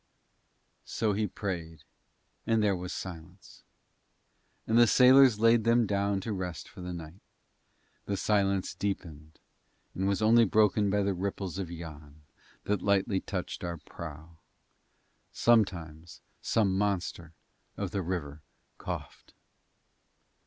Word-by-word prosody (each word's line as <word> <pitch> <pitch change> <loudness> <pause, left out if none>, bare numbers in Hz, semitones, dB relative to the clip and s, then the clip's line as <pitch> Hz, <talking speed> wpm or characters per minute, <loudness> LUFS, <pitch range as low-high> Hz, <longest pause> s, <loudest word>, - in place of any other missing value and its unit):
So 110 -2 -1
he 105 +1 0
prayed, 85 -5 -5 0.6
and 115 -1 +2
there 100 -2 +2
was 90 0 -6
silence. 90 +1 -9 1.0
And 110 - 0
the 120 0 +7
sailors 130 -2 +6
laid 115 0 +4
them 115 +1 +3
down 100 -1 0
to 110 +2 -3
rest 90 -5 -5
for - - -12
the 90 0 -5
night. 85 +2 -9 0.8
The 100 - -2
silence 100 -2 +1
deepened, 80 -6 -5 0.5
and 95 +1 -1
was 100 -1 +1
only 115 +2 +5
broken 105 -1 +3
by 100 +1 +1
the 100 0 0
ripples 95 0 -4
of 95 -4 -4
Yann 75 -3 -10 0.4
that 105 -2 -1
lightly 100 -1 +1
touched 95 0 -5
our 85 -1 -4
prow. 80 +1 -10 0.9
Sometimes 85 -8 0 0.2
some 100 -4 +1
monster 95 -4 -2 0.4
of 100 -3 -3
the 100 - -1
river 80 -5 -4 0.4
coughed. - - -7
95 Hz, 125 wpm, -29 LUFS, 85-105 Hz, 1.0 s, the